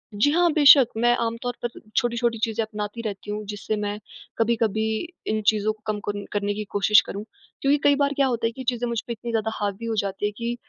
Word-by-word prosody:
जी 220 +8 +3
हाँ, 345 +1 +3
बेशक़। 280 -5 +8
मैं 240 0 +5
आमतौर 230 +1 -2
पर - - 0 0.3
छोटी-छोटी 235 -1 +1
चीज़ें 225 0 0
अपनाती 210 +1 -5
रहती 205 0 -5
हूँ, 210 0 -4
जिससे 205 +1 -3
मैं 210 0 -3 0.4
कभी-कभी 225 -2 +1 0.4
इन 215 0 0
चीज़ों 215 0 +3
को 215 - -26
कम 210 - -4
कन 205 0 -3
करने 205 0 -1
की 215 - -4
कोशिश 205 +1 +5
करूँ। 200 +2 -6 0.4
क्योंकि 280 +1 +3
कई 285 0 +5
बार 280 0 +1
क्या 275 -1 +3
होता 235 -2 -1
है - - -3
कि 260 +3 -9
ये - - -8
चीज़ें 245 -1 -2
मुझ 235 -2 -1
पे 235 - -2
इतनी 235 +1 -6
ज़्यादा 220 -1 0
हावी 205 +2 -3
हो 225 - -1
जाती 200 +1 -2
है 210 - 0
कि 235 0 -2
225 Hz, 230 wpm, -24 LUFS, 210-240 Hz, 0.4 s, बेशक़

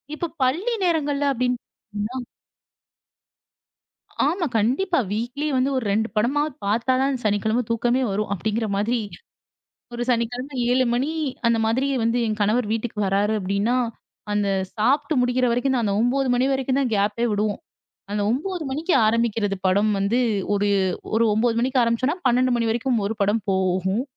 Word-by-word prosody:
இப்போ 345 - -3 0.2
பள்ளி 355 - 0
நேரங்கள்ல 290 -4 0
அப்டின்னு 250 0 0
பார்த்தீங்கனா 215 +5 -7 2.0
ஆமா. 350 -1 0
கண்டிப்பா. 275 - +1
வீக்லி 245 +7 -3
வந்து 255 +2 +2
ஒரு 255 - -1
2 220 +2 +1
படமாவது 280 +6 +1
பார்த்தா 230 +5 +1
தான் 275 -1 0
சனிக்கிழமை 215 +3 +1
தூக்கமே 240 +3 +1
வரும். 210 +1 -2
அப்டிங்கிற 215 +4 -2
மாதிரி 230 +4 0 1.0
ஒரு 240 - -3
சனிக்கிழமை 245 +3 -2 0.2
7 255 +1 +3
மணி 265 +5 0 0.4
அந்த 235 -1 +3
மாதிரி 255 +5 +1
வந்து 230 +2 +1
என் 215 -1 -2
கணவர் 215 +3 +2
வீட்டுக்கு 225 -1 -3
வர்றாரு 200 +2 +1
அப்டின்னா, 200 +6 0 0.6
அந்த 205 -1 +1 0.3
சாப்ட்டு 280 +8 +1
முடிக்கிற 250 +1 +2
வரைக்கும் 245 +3 +1
தான் 240 -3 +1
அந்த 200 - 0
9 260 +3 +1
மணி 245 - +2
வரைக்கும் 265 0 0
தான் 255 -4 0
கேப்பே 205 +3 0
விடுவோம். 210 0 -1 0.5
அந்த 205 0 -1
9 335 +8 -2
மணிக்கு 315 +7 -1
ஆரம்பிக்கிறது 220 -3 +1
படம் 205 +3 +3
வந்து, 200 +5 +1 0.4
ஒரு 205 0 +1 0.5
ஒரு 230 - +3
9 230 +1 +2
மணிக்கு 255 +1 +1
ஆரம்பிச்சோம்னா, 235 +7 +1
12 250 0 +3
மணி 230 -1 0
வரைக்கும் 240 +2 0
ஒரு 220 - -2
படம் 205 +2 +1
போகும். 190 +3 0
235 Hz, 150 wpm, -23 LUFS, 210-260 Hz, 2.0 s, 7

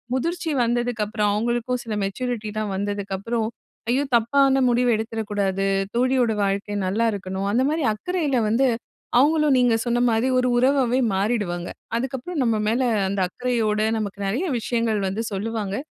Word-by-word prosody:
முதிர்ச்சி 335 +5 -2
வந்ததுக்கப்பறம், 225 -3 0
அவங்களுக்கும் 240 +2 -1
சில 225 - -5
மெச்சூரிட்டிலாம் 215 -1 -3
வந்ததுக்கப்பறம், 205 +3 -2 0.4
ஐயோ! 260 +4 +2
தப்பான 270 +3 +3
முடிவு 245 +1 +2
எடுத்திரக் 220 -1 -4
கூடாது. 195 -1 0 0.3
தோழியோட 250 -2 +2
வாழ்க்கை 200 +1 -1
நல்லா 220 +5 +1
இருக்கணும். 190 0 -4
அந்த 240 +5 +2
மாரி 315 -1 -1
அக்கறையில 295 - -1
வந்து, 260 +5 +3 0.5
அவங்களும் 300 0 +4
நீங்க 245 -2 +4
சொன்ன 240 0 +1
மாரி 225 +3 +1
ஒரு 250 - +1
உறவாவே 260 -1 +3 0.2
மாறிடுவாங்க. 190 -4 -1 0.3
அதுக்கப்பறம் 265 +6 -3
நம்ம 230 -3 +2
மேல 230 +4 +1 0.3
அந்த 200 0 -2
அக்கறையோடு 220 -2 0
நமக்கு 200 -1 -4
நெறைய 255 - -1
விஷயங்கள் 230 -2 0
வந்து 210 +4 -2
சொல்லுவாங்க. 210 -1 -3
230 Hz, 135 wpm, -23 LUFS, 205-250 Hz, 0.5 s, அவங்களும்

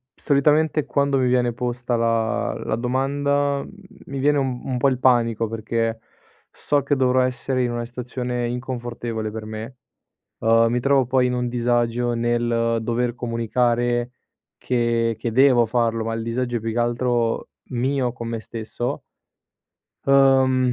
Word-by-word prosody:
solitamente 150 +1 +2
quando 140 -1 +1
mi 130 -1 +2
viene 125 -1 +2
posta 125 0 -2
la 115 -1 0
la - - 0
domanda, 140 +3 0
mhmm, - - -12 0.3
mi 140 0 -5
viene 145 +2 +3
un 130 -3 -1
un 130 -2 -2
po' 135 +3 +3
il 130 -1 -2
panico 115 -3 +2
perché 115 +1 -2 0.5
so 145 -1 0
che 145 +1 +1
dovrò 130 -1 +3
essere 130 0 -1
in 120 - -1
una 120 0 -3
situazione 125 0 -4
inconfortevole 120 -3 -4
per 110 0 -6
me. 110 +3 -7 0.6
Uhm, 115 +1 +4
mi 125 - +1
trovo 135 -1 +3
poi 130 0 +2
in 125 - -1
un 125 0 -1
disagio 120 0 0
nel 115 0 0
dover 120 +1 -1
comunicare 120 +1 0 0.5
che 115 -2 0
che 115 0 -2
devo 125 -1 +5
farlo, 115 -1 0
ma 115 0 -2
il 115 - -3
disagio 120 +1 -2
è - - -2
più 115 +1 -3
che 115 - -2
altro 120 -1 0 0.2
mio 130 0 0
con 120 -2 -7
me 115 -1 -3
stesso 115 +2 -5 1.0
uhm, 130 -2 +4
120 Hz, 155 wpm, -22 LUFS, 115-130 Hz, 1.0 s, devo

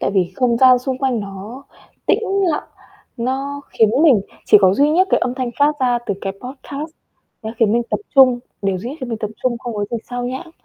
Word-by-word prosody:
tại - - 0
vì 180 -1 +1
không 245 -2 +2
gian 255 -1 +6
xung 260 0 -4
quanh 260 -4 0
nó 205 +7 -9 0.4
tĩnh - - +3 0.3
lặng, 300 - -3 0.5
nó 270 +4 -3
khiến 220 -2 +3
mình 275 -11 +6 0.3
chỉ - - +7
có 190 -1 +4
duy 285 +7 +3
nhất 370 +4 +3
cái - - +3
âm 250 - -1
thanh 255 -2 -3
phát 290 +1 +4
ra 245 -2 +2
từ 200 - -1
cái 195 - -3
podcast, 275 +4 -7 0.5
nó 220 - -4
khiến 220 -3 +3
mình 240 +1 +2
tập - - -1
trung, 260 -3 +6 0.2
điều 195 -2 0
duy 230 - -6
nhất 290 - -8
khiến 255 - -5
mình 225 -2 -3
tập 215 -1 -4
trung, 245 -2 0
không 235 -1 -6
có 205 -1 -1
gì 235 - -1
xao 245 0 -3
nhãng. 260 +7 -6
245 Hz, 230 wpm, -19 LUFS, 220-270 Hz, 0.5 s, chỉ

